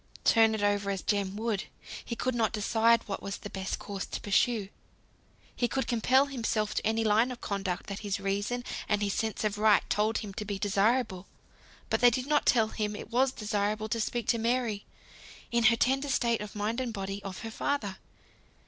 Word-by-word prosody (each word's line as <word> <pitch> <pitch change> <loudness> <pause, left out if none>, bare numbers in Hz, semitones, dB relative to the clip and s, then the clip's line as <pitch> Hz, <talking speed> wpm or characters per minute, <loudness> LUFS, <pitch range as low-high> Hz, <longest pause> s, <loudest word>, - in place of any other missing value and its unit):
Turn 225 -1 +5
it 210 - -3
over 205 0 +1
as 195 -1 -2
Jem 200 -2 0
would, 215 -2 -2 0.4
he 235 - -4
could 255 +2 -1
not 230 -2 +1
decide 230 +2 +3
what 195 - -4
was 195 - -4
the 205 - -9
best 190 -1 -3
course 200 -2 -5
to - - -5
pursue. 210 0 +1 0.9
He 240 - +1
could 265 +2 -1
compel 255 +3 +3
himself 225 -6 -1
to - - -1
any 225 +1 +1
line 220 +3 +3
of 245 - -7
conduct 195 -3 -3
that 200 -1 -5
his 205 -2 -2
reason 200 +5 -1 0.3
and 210 -1 +2
his 200 -1 0
sense 220 -1 -2
of 210 -1 -1
right 210 -2 +4
told 215 +2 +2
him 205 -3 -5
to 210 - -4
be 205 -1 -4
desirable; 205 0 +1 0.6
but - - +1
they 245 - +8
did 250 +2 -2
not 295 +1 +1
tell 225 -3 +4
him 210 -1 -3
it 215 - -9
was 255 +2 +3
desirable 210 -1 -2
to 230 +1 0
speak 240 +2 -2
to 230 - +3
Mary, 230 -3 0 0.6
in 235 -1 +2
her 230 +1 +7
tender 270 +4 +1
state 235 -4 +1
of 210 0 -7
mind 215 +4 -1
and 245 -3 -3
body, 195 -1 -4
of 195 -2 -7
her 225 0 -6
father. 220 -6 -2
215 Hz, 200 wpm, -29 LUFS, 205-235 Hz, 0.9 s, they